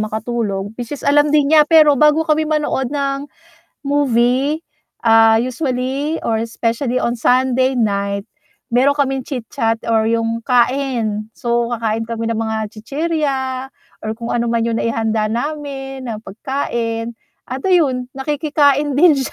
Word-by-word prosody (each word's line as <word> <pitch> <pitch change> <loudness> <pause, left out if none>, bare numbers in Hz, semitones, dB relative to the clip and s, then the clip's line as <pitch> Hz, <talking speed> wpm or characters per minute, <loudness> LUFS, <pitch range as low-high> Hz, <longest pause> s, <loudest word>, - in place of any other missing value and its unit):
makatulog 215 -2 -3
which 245 +4 -4
is 285 - -10
alam 290 +1 +4
din 295 -1 +3
niya, 305 -1 +6
pero 305 -4 +6
bago 300 +1 +4
kami 310 0 +1
manood 295 -4 0
ng 280 0 -2 0.6
movie, 275 +1 +2 0.5
ah, 225 0 +6
usually 260 +4 -2
or 225 -1 0
specially 235 +2 -1
on 235 - 0
Sunday 255 +2 +2
night, 200 -2 -1 0.5
meron 275 +3 +3
kaming 270 -2 0
chit-chat 230 -3 -2
or 225 -1 +2
yung 230 0 -1
kain. 240 -4 0
So, 235 0 0
kakain 225 -1 -1
kami 230 -1 -3
ng 230 - -1
mga 220 -1 -1 0.2
chichirya 290 +4 -1 0.7
or 215 - -2
kung 235 - -5
ano 235 -1 0
man 230 -1 +1
yung 230 -1 -1
naihanda 225 -1 0
namin 270 +1 -4
na 215 - -4
pagkain. 230 0 -3 0.3
At 260 +1 -5
ayun 275 -9 +2
nakikikain 290 0 +1
din 335 0 +6
siya. - - -6
250 Hz, 140 wpm, -18 LUFS, 230-285 Hz, 0.7 s, niya